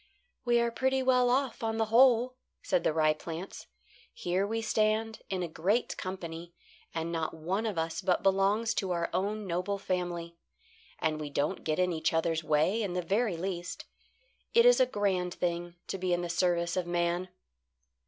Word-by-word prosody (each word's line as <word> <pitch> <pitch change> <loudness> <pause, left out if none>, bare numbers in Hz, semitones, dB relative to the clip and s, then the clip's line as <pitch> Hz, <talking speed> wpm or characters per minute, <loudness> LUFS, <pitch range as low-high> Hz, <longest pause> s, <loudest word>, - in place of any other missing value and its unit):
"We 240 -1 +4
are 235 0 +1
pretty 265 +2 +1
well 250 -1 +4
off 260 0 0
on 225 -1 -1
the 225 - +2
whole," 250 0 +5 0.3
said 275 - +1
the - - +2
rye 155 -1 +3
plants. 165 +4 -7 0.4
"Here 185 +3 -1
we 225 +2 -1
stand 220 +1 +1
in 185 -2 -1
a - - -2
great 190 +9 0
company, 170 -2 -6 0.4
and 165 0 -3
not 165 -1 -2
one 185 +8 -2
of 205 -5 -3
us 160 0 -2
but 180 - +1
belongs 195 +4 +2
to 195 - -2
our 170 -1 -2
own 210 +2 -1
noble 185 +3 -1
family. 175 -3 -3 0.6
And 155 -1 -1
we 150 - -4
don't 145 +1 -1
get 155 -1 0
in 180 -1 +2
each 160 0 0
other's 165 0 +1
way 155 +8 +2
in 195 -4 -2
the 180 0 -1
very 200 +1 0
least. 175 0 -4 0.7
It 465 0 +7
is - - +7
a 255 - +5
grand 190 -6 -1
thing 175 0 -2
to 195 - -3
be 180 -1 0
in 175 - +1
the 175 - -3
service 170 0 +1
of 180 -2 -1
man." 175 +1 0
180 Hz, 185 wpm, -30 LUFS, 170-220 Hz, 0.7 s, It